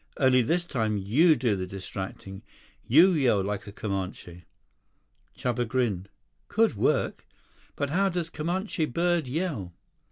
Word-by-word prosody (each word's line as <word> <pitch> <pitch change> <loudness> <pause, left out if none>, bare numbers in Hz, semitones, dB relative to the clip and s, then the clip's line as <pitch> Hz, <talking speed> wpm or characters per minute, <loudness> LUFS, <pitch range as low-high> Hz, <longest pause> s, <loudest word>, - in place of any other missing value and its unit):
Only 130 -2 +4
this 170 +9 0
time 110 -10 -1
you 140 - +4
do 120 -5 +1
the 95 -1 -4
distracting. 95 0 -7 0.5
You 165 +10 +7
yell 125 - +2
like 105 +3 -4
a - - -7
Comanche." 95 -4 -5 0.9
84 125 - -1
Chuba 120 0 -1
grinned. 110 -6 -1 0.4
"Could - - +2
work. - - 0 0.5
But 145 -1 -2
how 195 +4 +2
does 170 -2 -3
Comanche 175 +2 -2
bird 170 +1 0
yell?" 130 - -3
125 Hz, 135 wpm, -27 LUFS, 100-165 Hz, 0.9 s, You